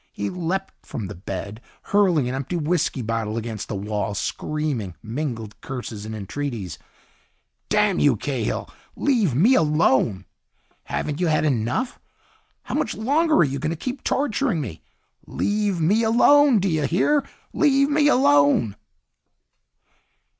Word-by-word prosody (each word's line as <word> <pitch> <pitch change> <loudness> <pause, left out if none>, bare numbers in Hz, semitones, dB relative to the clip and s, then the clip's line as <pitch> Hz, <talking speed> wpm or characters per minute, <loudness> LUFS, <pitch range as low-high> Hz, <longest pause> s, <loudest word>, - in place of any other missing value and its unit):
He 100 - -4
leaped 180 +2 -3
from 110 - -6
the 100 - -6
bed, 100 +4 -6 0.2
hurling 180 -10 +2
an 125 - -2
empty 135 +6 -3
whisky 150 -5 0
bottle 115 -1 -2
against 110 -2 -5
the 105 - -4
wall, 105 +1 -3
screaming 135 - -3
mingled 115 -3 -5
curses 120 -5 -6
and 110 - -5
entreaties. 110 - -5 0.9
"Damn 210 -3 +2
you, 145 -4 +4
Cahill, 120 0 -3 0.3
leave 225 - +1
me 205 - +5
alone! 135 - +2 0.6
Haven't 150 +1 -3
you 180 - +1
had 155 -1 +2
enough? 130 - -1 0.6
How - - -6
much - - -1
longer 305 +7 +2
are - - +6
you 140 -2 -2
going 155 - -1
to 165 - -2
keep 255 - -5
torturing 265 - 0
me? 105 - -6 0.5
Leave 205 -3 -1
me 195 +8 +3
alone, 255 +4 +5
do 195 0 +1
you 155 -5 +1
hear? 285 - +2 0.3
Leave 280 -2 +3
me 290 0 +3
alone!" 145 - +4
150 Hz, 140 wpm, -23 LUFS, -, 0.9 s, are